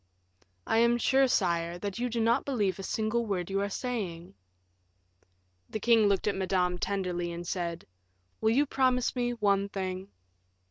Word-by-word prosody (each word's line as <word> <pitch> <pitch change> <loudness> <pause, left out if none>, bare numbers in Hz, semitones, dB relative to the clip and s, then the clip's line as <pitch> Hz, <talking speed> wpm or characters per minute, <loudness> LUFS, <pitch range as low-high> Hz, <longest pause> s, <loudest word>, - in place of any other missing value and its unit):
"I 225 - +2
am 235 +1 +4
sure, 265 +3 +3
sire, 170 -6 0
that 200 +3 -5
you 245 +1 -1
do 230 0 -2
not 230 +4 +2
believe 210 -9 -1
a - - -3
single 220 +4 -1
word 185 -2 -2
you 195 0 +1
are 200 - -1
saying." 195 -8 -4 1.4
The 220 - -4
king 225 -2 +4
looked 200 -2 +1
at 210 - +1
Madame 185 -2 0
tenderly, 180 -3 -2
and 170 +1 -6
said, 170 -2 -3 0.5
"Will 220 - +2
you 270 +6 +3
promise 255 -2 +1
me 245 -1 0
one 200 -3 +1
thing?" 190 0 -4
200 Hz, 165 wpm, -29 LUFS, 185-235 Hz, 1.4 s, am